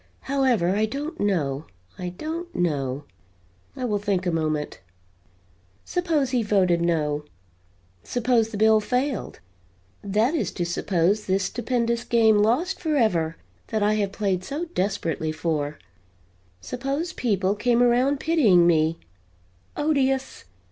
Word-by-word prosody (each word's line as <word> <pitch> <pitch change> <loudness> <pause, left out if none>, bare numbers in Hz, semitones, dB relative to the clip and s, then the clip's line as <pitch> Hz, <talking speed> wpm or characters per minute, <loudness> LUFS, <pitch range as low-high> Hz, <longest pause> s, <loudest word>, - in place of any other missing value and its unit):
However, 260 -10 +1
I 215 +1 +2
don't 285 +7 -5
know 155 -8 0 0.3
I 180 -1 -3
don't 320 - -6
know. 145 -5 -1 0.7
I 255 - -3
will 210 -4 0
think 195 -2 -1
a 175 - +1
moment. 155 -2 -2 1.1
Suppose 320 -7 0
he 250 -2 +2
voted 190 -5 +2
no; 150 -3 0 0.8
suppose 240 - +1
the 220 - -6
bill 220 +1 +5
failed; 250 +3 -2 0.6
that 215 +7 +1
is 325 - -1
to 175 - -2
suppose 180 +3 0
this 190 +1 +1
stupendous 235 +1 -1
game 225 -3 +4
lost 250 - +1
forever, 220 - +1 0.3
that 215 -2 -1
I 210 +1 +3
have 205 -2 0
played 195 -3 -1
so 295 - -4
desperately 170 -5 -1
for; 155 -2 -2 0.8
suppose 275 - -3
people 200 - 0
came 240 +3 +2
around 255 +4 +3
pitying 230 - +4
me 160 -1 +3 0.8
odious! 270 -3 0
210 Hz, 125 wpm, -24 LUFS, 175-255 Hz, 1.1 s, bill